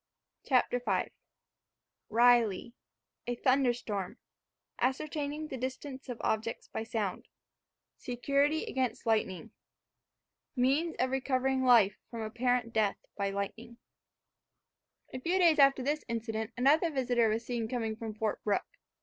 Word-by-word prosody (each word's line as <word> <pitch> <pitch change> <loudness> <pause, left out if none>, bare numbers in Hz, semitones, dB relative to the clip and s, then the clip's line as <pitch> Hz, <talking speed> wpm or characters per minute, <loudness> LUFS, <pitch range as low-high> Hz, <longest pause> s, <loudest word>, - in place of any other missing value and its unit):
CHAPTER 250 -2 +2
V - - 0 1.0
RILEY 235 -2 +3 0.5
A 245 - -1
THUNDERSTORM 240 -7 0 0.6
ASCERTAINING 295 +3 -2
THE 265 - -5
DISTANCE 260 +1 -6
OF 245 - -4
OBJECTS 220 +1 -2
BY - - -4
SOUND 215 -4 -3 0.7
SECURITY 280 +5 0
AGAINST 255 -3 -2
LIGHTNING 215 -5 0 1.0
MEANS 280 +6 +1
OF 255 +1 0
RECOVERING 265 0 0
LIFE 225 -6 +5
FROM 230 -2 -5
APPARENT 240 +1 0
DEATH 215 -3 +2 0.2
BY 200 -1 -1
LIGHTNING 200 +4 -5 1.4
A 255 - -4
few 345 +8 0
days 335 -5 +5
after 275 -2 +5
this 295 +3 -1
incident 225 -1 -3
another 295 +7 +4
visitor 245 -5 +2
was 225 +2 -1
seen 235 -2 -2
coming 225 -2 -2
from 220 -1 -6
Fort 215 -1 -2
Brooke. 215 - -2
245 Hz, 120 wpm, -31 LUFS, 225-265 Hz, 1.4 s, LIFE